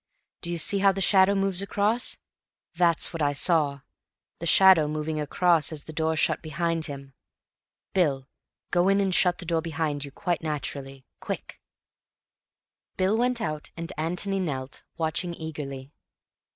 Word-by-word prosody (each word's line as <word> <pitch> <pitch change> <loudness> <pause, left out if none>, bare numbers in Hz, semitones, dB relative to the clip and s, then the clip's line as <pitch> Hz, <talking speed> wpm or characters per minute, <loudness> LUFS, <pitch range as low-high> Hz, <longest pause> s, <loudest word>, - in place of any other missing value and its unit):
D'you 170 0 -2
see 195 +5 +2
how 195 0 +5
the 195 - -5
shadow 195 0 +4
moves 195 -1 +2
across? 210 +4 0 0.6
That's 170 -1 +2
what 165 - -4
I 145 -1 +2
saw—the 145 +1 -2
shadow 185 -4 +7
moving 155 +1 -3
across 165 +2 +2
as 155 -2 -5
the 155 - -10
door 160 0 0
shut 160 - +1
behind 165 +1 -2
him. 140 -2 -9 0.8
Bill, 140 -8 +1 0.4
go 175 +1 +3
in 195 0 +3
and 195 -2 +1
shut 180 0 +3
the 180 - -8
door 165 -1 0
behind 155 -3 -2
you—quite 170 +5 -3
naturally. 140 -3 -5
Quick!" - - -6 1.4
Bill 190 +3 +2
went 245 +1 0
out 155 -4 -4
and 170 +2 -5
Antony 180 +5 -2
knelt, 135 -7 -4 0.2
watching 170 +2 -2
eagerly. 145 -4 -7
165 Hz, 140 wpm, -26 LUFS, 150-185 Hz, 1.4 s, shadow